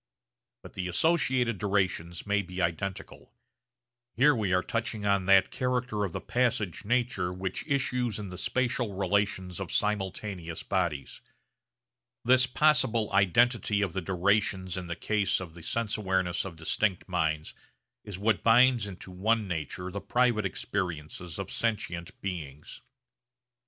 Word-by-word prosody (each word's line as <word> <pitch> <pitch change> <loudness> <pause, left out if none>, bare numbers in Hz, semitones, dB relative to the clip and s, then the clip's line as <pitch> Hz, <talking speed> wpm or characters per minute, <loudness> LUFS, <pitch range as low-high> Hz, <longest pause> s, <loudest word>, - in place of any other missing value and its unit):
But - - -11
the 90 - -3
associated 125 - +2
durations 95 -4 -1
may 100 0 +2
be 90 -1 -8
identical. 85 +2 -3 0.8
Here 145 +5 +5
we 105 -5 -1
are 90 0 +3
touching 115 -2 -2
on 100 -2 +2
that 95 -1 +5
character 125 -4 -1
of 95 - -2
the - - -4
passage 115 -8 0
nature 120 -6 0
which 95 +7 -4
issues 125 -6 0
in 105 -2 -6
the 90 - -8
spatial 120 -4 -1
relations 95 -2 0
of - - -5
simultaneous 95 -4 -2
bodies. 85 -8 -2 1.0
This 130 +1 +5
possible 125 -6 +2
identity 105 +2 +3
of 95 -5 -2
the 95 - -2
durations 95 0 +1
in 90 -2 -5
the 85 - -3
case 105 +3 0
of 90 -4 -8
the 85 - -12
sense 110 +6 -1
awareness 95 -4 0
of 95 -3 -7
distinct 90 +4 -1
minds 80 -4 -1 0.5
is 100 -3 -7
what 105 +1 +1
binds 120 -1 +5
into 95 -1 -9
one 105 +3 +1
nature 90 +2 -4
the 100 - -5
private 110 0 +2
experiences 85 -3 -4
of 100 -2 -5
sentient 90 -7 -2
beings. 75 -7 -6
100 Hz, 140 wpm, -29 LUFS, 90-115 Hz, 1.0 s, Here